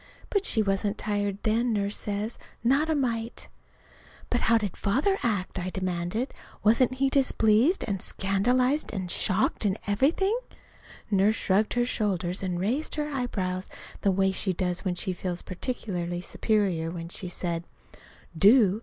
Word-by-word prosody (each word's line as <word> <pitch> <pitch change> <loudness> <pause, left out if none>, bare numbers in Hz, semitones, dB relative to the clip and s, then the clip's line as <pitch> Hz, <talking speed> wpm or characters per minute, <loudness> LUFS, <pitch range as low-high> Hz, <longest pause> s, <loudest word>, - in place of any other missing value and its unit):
But 400 -2 +1
she 220 - +3
wasn't 200 +1 0
tired 205 -2 -1
then, 230 +2 +1
Nurse 200 0 0
says 210 +2 -3 0.2
not 275 +6 +3
a 315 - +2
mite. 235 -4 -2 0.8
"But 245 - +1
how 230 - +4
did 205 -5 -3
Father 280 - +1
act?" 200 -4 -1
I 180 +1 -3
demanded. 185 +6 -2 0.3
"Wasn't 230 +4 +4
he 270 +1 +2
displeased 265 - +3
and 195 -4 -2
scandalized 250 +9 +1
and 185 -4 -3
shocked, 210 +2 +1
and 200 -1 +1
everything?" 305 - +2 0.8
Nurse 200 +2 +4
shrugged 210 +3 +1
her 240 0 +2
shoulders 190 -6 -1
and 180 -2 -2
raised 245 - -1
her 300 -1 -2
eyebrows 190 -8 -2 0.3
the 200 - +2
way 190 0 +2
she 190 0 +1
does 180 0 -1
when 185 -3 -1
she 185 +1 -1
feels 180 -1 -4
particularly 180 -4 -3
superior. 185 -4 0
Then 170 -1 -6
she 185 - -3
said: 170 -1 -3 0.7
"Do? 205 +2 +5
205 Hz, 150 wpm, -27 LUFS, 185-240 Hz, 0.8 s, Do